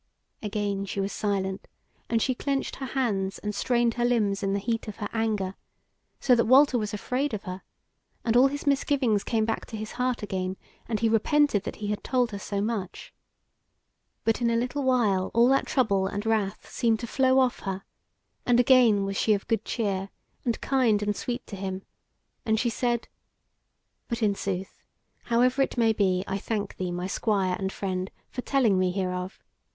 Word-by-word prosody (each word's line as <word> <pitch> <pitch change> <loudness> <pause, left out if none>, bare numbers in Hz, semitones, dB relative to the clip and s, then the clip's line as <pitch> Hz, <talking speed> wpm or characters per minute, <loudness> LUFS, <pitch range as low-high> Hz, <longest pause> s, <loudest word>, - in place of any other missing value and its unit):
Again 205 -2 -2
she 195 - -4
was 195 +1 -1
silent, 195 -2 -2 0.4
and 230 -1 +2
she 260 - +1
clenched 275 +2 -2
her 265 - -5
hands 210 -8 -1
and 210 0 -4
strained 235 +2 +1
her 240 - -1
limbs 215 -5 +1
in 195 -1 0
the - - +1
heat 225 +2 -2
of 210 - -6
her 210 - -4
anger; 215 -4 0 0.7
so 255 - +4
that 235 -1 +4
Walter 265 0 +6
was 210 -1 -3
afraid 250 +5 -1
of 205 - -7
her, 185 -1 -6 0.6
and 230 -1 +2
all 255 +2 +7
his 285 +2 -5
misgivings 270 -6 +2
came 220 -2 +1
back 225 0 -2
to 220 - -6
his 215 0 -6
heart 250 -2 -1
again, 190 -2 -3 0.3
and 220 -2 -2
he 230 - +3
repented 225 -1 +2
that - - -4
he 210 - -5
had 210 - -2
told 250 -3 +1
her 200 - -5
so 200 0 -3
much. 210 -3 -4 1.1
But 225 +2 +1
in 235 - +3
a 230 - +1
little 250 +5 -1
while 225 -8 +2
all 235 +1 +6
that 270 0 +2
trouble 200 -8 +2
and 205 +2 -4
wrath 215 -3 -1
seemed 225 -3 +1
to - - -3
flow 260 +2 +2
off 255 -2 +3
her, 195 0 -4 0.6
and 245 -1 +3
again 240 -6 +5
was 195 0 -3
she 215 - +3
of 200 - -6
good 225 -2 0
cheer, 195 -4 -2 0.3
and 235 -2 -1
kind 240 -6 +2
and 205 0 0
sweet 245 +2 -4
to 205 - -8
him 190 0 -4 0.6
and 220 -3 +1
she 240 0 +1
said: 240 0 -1 1.0
"But 235 -1 -2
in 205 -2 +3
sooth, 195 -1 -4 0.4
however 250 +3 +3
it 270 - 0
may 225 -2 +4
be, 190 -3 +1
I 195 0 -2
thank 210 0 -3
thee, 180 -1 -2
my 175 +1 -3
Squire 190 -1 0
and 190 -1 -2
friend, 185 -1 -3 0.2
for 250 - -4
telling 240 -9 +2
me 185 0 +2
hereof. 180 0 -3
220 Hz, 190 wpm, -27 LUFS, 195-245 Hz, 1.1 s, all